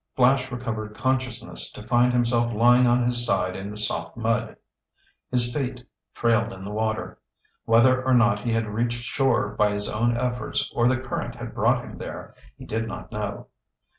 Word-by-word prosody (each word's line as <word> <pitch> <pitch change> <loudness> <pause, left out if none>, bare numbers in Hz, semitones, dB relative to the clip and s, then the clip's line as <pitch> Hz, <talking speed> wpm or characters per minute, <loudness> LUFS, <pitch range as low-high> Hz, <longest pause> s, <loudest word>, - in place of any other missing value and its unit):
Flash 130 +1 +3
recovered 110 -3 -4
consciousness 130 -3 -2
to 105 - -9
find 120 +1 +3
himself 120 -1 +1
lying 120 +3 +5
on 120 +1 +3
his 120 0 +3
side 95 -5 +1
in 95 +1 -6
the 105 - -8
soft 85 -5 -3
mud. 115 0 -1 0.7
His 120 -1 +1
feet 125 -3 -3 0.3
trailed 115 -1 +2
in 95 -2 -9
the 100 - -6
water. 110 +1 -2 0.5
Whether 130 +3 +4
or 130 0 +3
not 120 -4 +4
he 115 +3 -2
had 115 0 +1
reached 115 +3 -2
shore 120 -3 +1
by 105 0 +1
his 105 0 +1
own 120 +2 0
efforts 125 -2 -2
or 120 0 +2
the 130 0 +2
current 130 -1 -4
had - - -7
brought - - +1
him - - -10
there, - - -8 0.2
he - - -11
did 110 +1 -2
not 115 - -8
know. 105 -1 -5
120 Hz, 180 wpm, -25 LUFS, 110-125 Hz, 0.7 s, lying